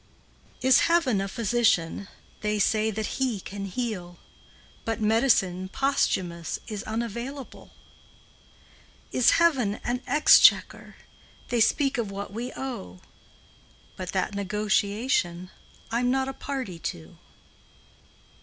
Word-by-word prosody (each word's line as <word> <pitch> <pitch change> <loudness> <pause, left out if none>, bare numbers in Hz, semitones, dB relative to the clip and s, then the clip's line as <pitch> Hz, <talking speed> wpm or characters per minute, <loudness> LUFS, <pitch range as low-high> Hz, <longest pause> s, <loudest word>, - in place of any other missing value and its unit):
XXI. - - 0
Is 260 - +7
Heaven 315 - +2
a 195 - -2
physician? 205 -5 +1 0.3
They 210 0 -1
say 215 +2 +2
that 220 0 -4
He 245 -6 0
can 200 +1 -7
heal, 190 -5 -4 0.7
But 225 -1 -2
medicine 210 -5 +2
posthumous 185 - -1
Is 210 -2 -5
unavailable. 235 +5 -5 1.4
Is 245 -2 +4
Heaven 270 -12 +3
an 245 +1 -2
exchequer? 295 +4 +5 0.5
They 240 -2 +1
speak 270 +3 +2
of 220 -4 -2
what 200 0 -6
we 240 +4 -4
owe; 90 - -6 1.0
But 185 -1 -6
that 190 +1 -1
negotiation 200 -2 0 0.4
I 230 - +1
'm 245 0 +1
not 265 +1 +1
a 270 - -4
party 260 -12 -5
to. 80 - -7
220 Hz, 115 wpm, -26 LUFS, 195-250 Hz, 1.4 s, Is